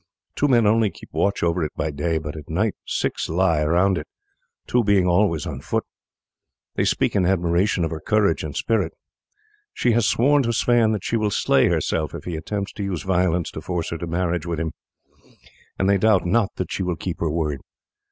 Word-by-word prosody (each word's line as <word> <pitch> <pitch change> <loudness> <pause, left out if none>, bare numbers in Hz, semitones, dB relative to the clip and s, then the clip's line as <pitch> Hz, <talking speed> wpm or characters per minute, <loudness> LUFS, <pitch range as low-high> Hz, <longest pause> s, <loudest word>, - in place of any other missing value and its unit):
Two 145 - +2
men 120 -5 +4
only 110 0 +3
keep 85 - -14
watch 100 0 0
over 85 0 +1
it 75 - -3
by 80 - -2
day, 80 +3 -1
but 75 -1 -5
at 75 -2 -10
night 100 +6 0
six - - -2
lie 85 -2 +2
around 90 +4 +2
it, 75 - -9 0.6
two 125 -1 +2
being 100 -3 +3
always 90 -4 +2
on - - -5
foot. - - -1 0.9
They - - 0
speak - - +1
in 95 -3 +3
admiration 90 0 +1
of 80 - -4
her 80 - -4
courage 105 -5 +1
and 75 -3 -5
spirit. 115 -1 0 0.8
She 120 - +2
has 115 -2 +2
sworn 145 +4 +3
to 115 -2 0
Sweyn 120 -2 +3
that 105 - -3
she 115 - 0
will 110 -1 +1
slay - - +3
herself 75 -3 -1
if - - -7
he 90 - -4
attempts 100 +5 -4
to 100 - -5
use 95 -5 -3
violence 90 -3 +1
to 80 - -7
force 85 +1 -3
her 85 - -3
to 85 - -4
marriage 85 0 -1
with 85 -2 -2
him, 80 -1 -2 1.1
and 95 - +1
they 100 0 +3
doubt 100 -4 +3
not 100 +3 +1
that 95 - -4
she - - -2
will 90 -2 -1
keep 80 +2 -5
her 80 - 0
word. 75 -3 -1
90 Hz, 210 wpm, -23 LUFS, 80-105 Hz, 1.1 s, men